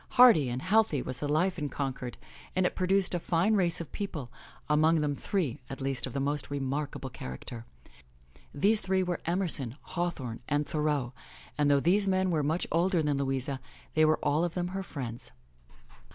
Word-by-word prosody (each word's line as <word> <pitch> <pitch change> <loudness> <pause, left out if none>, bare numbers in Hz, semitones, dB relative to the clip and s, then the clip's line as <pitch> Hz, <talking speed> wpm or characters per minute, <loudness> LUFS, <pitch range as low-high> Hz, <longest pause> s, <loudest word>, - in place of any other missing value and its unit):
Hearty 230 - +8
and 125 +2 -3
healthy 210 -6 +3
was 125 - -5
the 145 - -3
life 175 +5 +1
in 145 -1 -2
Concord 130 -2 -4 0.4
and 185 0 +2
it - - +1
produced 190 +1 +1
a 175 - +1
fine 170 +6 +2
race 180 -5 +2
of 170 - -7
people, 155 - -5 0.4
among 155 +2 +4
them 145 -1 0
three, 145 - -2
at 135 - -6
least, 135 -1 -1
of 130 +2 -3
most 145 +1 -1
remarkable 140 -1 -3
character. 115 - -7 0.8
These 210 +8 +3
three 190 0 +1
were 175 -2 -2
Emerson, 165 -9 0
Hawthorne 160 -10 -3
and 145 +1 +1
Thoreau, 145 -4 -1 0.4
and 145 -1 +2
though 140 -1 +5
these 195 +7 +3
men 190 -1 +2
were 160 -3 +2
much 155 +5 0
older 170 0 +2
than 145 -2 +1
Louisa, 135 0 -1 0.3
they 155 - +4
were 155 0 +4
all 150 +3 +2
of 175 -1 -2
them 180 -1 -1
her 190 +1 -3
friends. 130 -9 -6
150 Hz, 180 wpm, -30 LUFS, 135-180 Hz, 0.8 s, Hearty